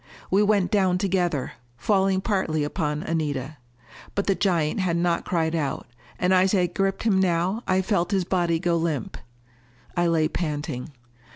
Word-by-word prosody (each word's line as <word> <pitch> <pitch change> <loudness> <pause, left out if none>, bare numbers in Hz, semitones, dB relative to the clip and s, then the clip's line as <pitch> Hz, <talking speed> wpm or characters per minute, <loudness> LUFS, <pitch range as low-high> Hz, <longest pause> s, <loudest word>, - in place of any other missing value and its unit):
We 195 +2 +4
went 205 -2 +2
down 190 -4 +3
together, 180 -7 0 0.3
falling 190 - +2
partly 190 -8 0
upon 150 0 -2
Anita. 150 -3 -2 0.6
But 200 - 0
the 195 - +3
giant 175 -5 0
had 175 -3 +1
not 170 0 0
cried 165 -2 0
out, 155 -4 -2 0.3
and 180 +1 +2
as 185 +2 +4
I 180 -2 +3
gripped 195 +2 -1
him 210 -4 +3
now, 185 +4 +1
I 185 0 +2
felt 185 -4 0
his 195 -3 +1
body 175 -2 +1
go 170 0 +1
limp. 160 -7 -2 0.8
I 175 0 +2
lay 160 -2 +2
panting. 150 -4 -4
175 Hz, 160 wpm, -25 LUFS, 160-190 Hz, 0.8 s, We